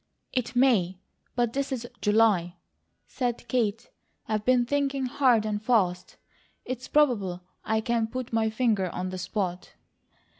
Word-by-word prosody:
"It 250 -1 -2
MAY, 215 -9 +3 0.4
but 240 -2 +1
this 275 0 -2
is 245 -2 -3
July," 205 -5 +3 0.5
said 240 -2 -3
Kate. 225 -3 -1 0.4
"I've 215 -1 -1
been 250 +1 +3
thinking 275 0 0
hard 250 -4 +3
and 210 -1 -2
fast. 190 -7 +1 0.5
It's 255 0 -5
probable 205 -12 +2 0.2
I 220 0 0
can 230 0 0
put 250 +1 -6
my 225 -1 +2
finger 220 -5 +1
on 180 +2 -4
the 185 - -5
spot." 180 -1 -3
225 Hz, 140 wpm, -27 LUFS, 205-250 Hz, 0.5 s, MAY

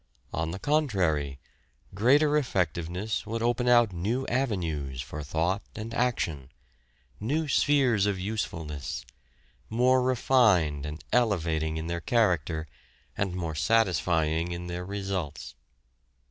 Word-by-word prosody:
On 80 +1 -1
the 90 - -4
contrary, 95 - +1 0.6
greater 145 +9 +4
effectiveness 95 - -1
would 115 +1 -2
open 120 +1 +1
out 120 -5 +5
new 110 +10 -1
avenues 85 - -2
for 70 +3 -5
thought 85 +7 -1
and 110 +1 -6
action, 85 - -1 0.7
new 150 +9 -1
spheres 130 -8 +3
of 100 -2 -1
usefulness, 80 -8 -4 0.6
more 125 +3 +3
refined 110 - +3
and 75 +2 -7
elevating 80 -9 +1
in 80 - -4
their 85 0 -3
character, 85 - +1 0.5
and 95 -2 -1
more 85 -3 -3
satisfying 85 -4 +1
in 85 0 -5
their 90 0 -4
results. 95 -9 -4
95 Hz, 115 wpm, -28 LUFS, 80-120 Hz, 0.7 s, out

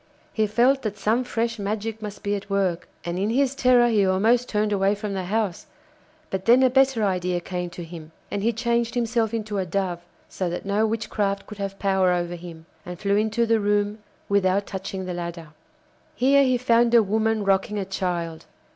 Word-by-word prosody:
He 220 -1 +1
felt 245 +6 +3
that 210 -3 -4
some 225 +5 +1
fresh 235 -2 -2
magic 215 +2 -3
must 210 -1 -7
be 205 - 0
at 200 0 -4
work, 190 -3 0 0.2
and 175 +1 -2
in 200 +2 0
his 265 +3 +2
terror 250 -3 +4
he 215 -4 +3
almost 220 +6 +2
turned 210 0 0
away 195 +1 +2
from 205 -1 -5
the 190 -2 -3
house; 210 - -2 0.6
but 190 -1 -3
then 245 +3 +6
a 255 - +4
better 265 -3 +3
idea 180 -2 0
came 180 0 -4
to 170 +1 -8
him, 165 -1 -10 0.2
and 200 - -2
he 230 +3 +2
changed 235 +1 -1
himself 230 -2 0
into 215 -3 -3
a 190 - -1
dove, 180 -1 -1 0.3
so 185 -2 -3
that 175 - -5
no 205 +2 +1
witchcraft 210 -2 -2
could 210 - -11
have 195 0 -4
power 190 -2 +2
over 175 -1 -1
him, 170 -2 -10 0.2
and 180 +1 -7
flew 200 0 +1
into 220 +2 +1
the 225 -1 +2
room 205 +1 0 0.3
without 200 0 +2
touching 190 -1 -5
the 180 - -4
ladder. 170 -2 -6 0.7
Here 275 +2 +4
he 255 -2 +2
found 235 -1 +3
a 230 - +7
woman 220 +1 0
rocking 195 +2 +1
a 195 - -2
child. 175 -4 -3
205 Hz, 200 wpm, -24 LUFS, 190-230 Hz, 0.7 s, a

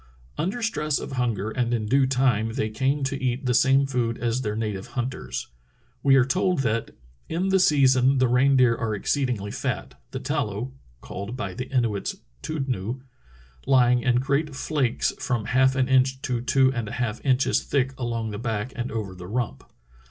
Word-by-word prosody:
Under 210 +8 -2
stress 150 -9 0
of - - -6
hunger 115 -5 -1
and 120 0 0
in 110 -2 -2
due 135 +4 +3
time 125 -4 +1
they 110 -1 -1
came 135 +6 0
to 135 0 -3
eat 130 +1 -1
the 125 - +2
same 135 +3 +4
food 120 -4 -1
as 120 +1 -1
their 105 -4 -2
native 105 -3 -3
hunters. 120 - -3 0.5
We 135 -1 +5
are 130 -2 +5
told 180 +2 +1
that 115 -1 0 0.4
In 180 +4 -1
the 190 0 +4
season 135 -5 +4
the 130 0 +3
reindeer 125 -1 +4
are 115 -2 -2
exceedingly 120 -3 -1
fat, 65 - -4
the - - -5
tallow 105 +5 -2 0.3
(called 100 +6 -6
by 95 -6 -4
the 125 +6 -6
Inuits 115 -6 0 0.3
tudnoo) 130 - -3 0.7
lying 125 -2 +4
in 125 0 +2
great 140 +3 0
flakes 140 -4 0
from 120 -5 -1
half 130 +1 +3
an 130 -1 +2
inch 130 0 +3
to 125 -3 -1
two 130 +1 +3
and 115 -3 -3
a - - -6
half 120 -2 -3
inches 135 -1 +2
thick 135 -1 0
along 115 -3 -2
the 105 - -5
back 115 0 -3
and 120 +1 -3
over 105 -4 -4
the 90 -1 -10
rump. 110 - -3
125 Hz, 180 wpm, -25 LUFS, 115-135 Hz, 0.7 s, We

